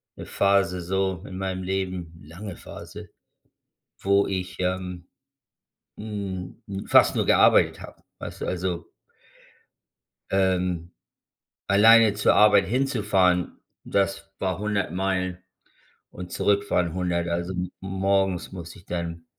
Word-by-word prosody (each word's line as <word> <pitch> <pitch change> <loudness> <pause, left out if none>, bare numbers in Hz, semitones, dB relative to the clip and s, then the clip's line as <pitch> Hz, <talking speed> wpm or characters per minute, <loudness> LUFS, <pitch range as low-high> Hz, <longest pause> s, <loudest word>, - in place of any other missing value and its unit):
'ne - - -8
Phase 100 -2 +2
so 95 0 -1
in 95 - -8
meinem 95 -1 -3
Leben, 90 -3 -4
lange 90 +5 -8
Phase, - - -10 0.9
wo 100 +1 +2
ich, 95 -1 -4
ähm, 90 -1 -3 0.9
hm, 100 -4 -5 0.3
fast - - +5
nur - - +1
gearbeitet - - +4
habe. - - -12 0.2
Weißt - - -8
du? - - -2
Also 90 -2 -3 1.4
ähm, 90 -3 0 0.8
alleine 110 +2 +6
zur 105 - +3
Arbeit 105 -2 +6
hinzufahren, 100 -8 +1 0.3
das 100 0 -1
war 95 -2 -1
100 105 -2 -1
Meilen 90 -1 -1 0.7
und 90 -1 -9
zurückfahren 100 -4 +1
100. 90 -2 -1
Also 85 +2 -2
m 90 0 -3
morgens 95 -1 0
musste 85 -3 -9
ich 90 - -21
dann 85 -1 -4
95 Hz, 115 wpm, -25 LUFS, 90-100 Hz, 1.4 s, alleine